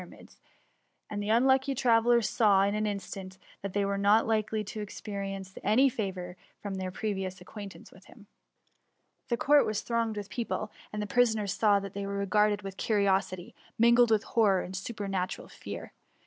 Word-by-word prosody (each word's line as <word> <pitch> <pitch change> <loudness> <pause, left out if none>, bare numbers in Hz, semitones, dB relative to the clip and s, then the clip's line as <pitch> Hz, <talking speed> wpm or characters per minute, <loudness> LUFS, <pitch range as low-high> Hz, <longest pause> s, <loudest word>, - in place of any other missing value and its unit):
ra* - - -10
mids; - - -16 0.7
and 205 -1 -3
the 205 - -3
unlucky 265 +4 +3
travellers 235 -2 +3
saw, 200 -4 +4
in 200 +1 +1
an 215 0 0
in 205 -1 -1
stant, 190 -1 -8 0.2
that 200 -2 -5
they 205 -1 +1
were 200 0 -1
not 205 +3 +4
likely 215 -1 0
to 210 +1 -6
experience 195 -2 -6
2S8 - - -23
TKE - - -31
uvuuy; - - -2
any 260 +6 +5
favour 185 -6 -5 0.2
from 205 -1 -5
their 190 -1 -3
prerioas 190 -1 -3
acquttsrfiaQee 200 +2 -10
with 185 - -18
him. 220 -4 -16 1.0
The 235 - +1
court 290 +4 +5
was 215 -1 -2
tbiooged 230 -2 -1
with 205 0 -6
pec^le, 225 -3 -3 0.2
and 210 0 -3
the - - -3
prisoners 220 -4 +2
saw 210 -2 +3
that 195 -1 -7
they 200 0 -4
were 200 0 -2
r^arded 210 +1 +2
with 195 -1 -7
curiosity, 195 -4 0 0.2
mingled 235 +1 +5
with 220 -1 +3
horror 205 -6 +2
and 185 - -7
super 205 +2 -5
natural 185 -2 -3
fear. - - -8
205 Hz, 190 wpm, -29 LUFS, 195-225 Hz, 1.0 s, any